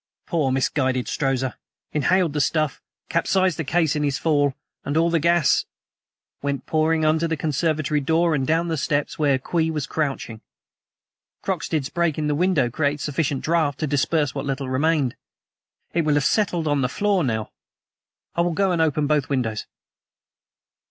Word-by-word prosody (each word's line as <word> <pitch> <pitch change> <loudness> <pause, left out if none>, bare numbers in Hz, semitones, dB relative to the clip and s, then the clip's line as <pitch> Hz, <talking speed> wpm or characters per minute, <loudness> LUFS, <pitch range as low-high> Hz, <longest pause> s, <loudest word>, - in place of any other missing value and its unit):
Poor, 150 -6 0
misguided 130 -1 0
Strozza 135 -2 -1 0.4
inhaled 170 +2 +2
the 150 - +1
stuff, 155 0 0 0.3
capsized 185 0 +1
the - - 0
case 160 +1 +1
in 150 - -1
his 145 -2 0
fall, 145 -4 +1 0.3
and 145 +2 -1
all 165 +1 +3
the 165 - +2
gas 170 -1 +3 0.4
" - - -61
"Went 140 -1 -2
pouring 160 0 +1
under 160 +2 +2
the 165 -1 -2
conservatory 155 0 0
door, 160 +4 +2
and 135 -3 0
down 165 +2 +1
the 165 -1 -1
steps, 145 +4 -1
where 140 -3 +3
Kwee 160 +5 -1
was 150 -3 -2
crouching. 135 -7 -3 1.0
Croxted's 145 -5 -2
breaking 165 -4 0
the 150 - +1
window 160 -4 +2
created 145 +4 -1
sufficient 145 -1 -1
draught 155 -4 +1
to 155 - -1
disperse 145 0 +1
what 135 - -3
little 135 -1 -2
remained. 140 -1 +1 0.8
It 170 - +2
will 150 -1 +2
have 145 - +2
settled 180 -7 +1
on 145 -2 +1
the 125 - +1
floor 200 +3 +1
now. 110 -5 -2 0.8
I 170 - +1
will 170 0 +1
go 195 +2 +1
and 170 -2 +1
open 150 -2 +1
both 150 -2 +1
windows." 120 -6 -1
150 Hz, 165 wpm, -23 LUFS, 140-165 Hz, 1.0 s, all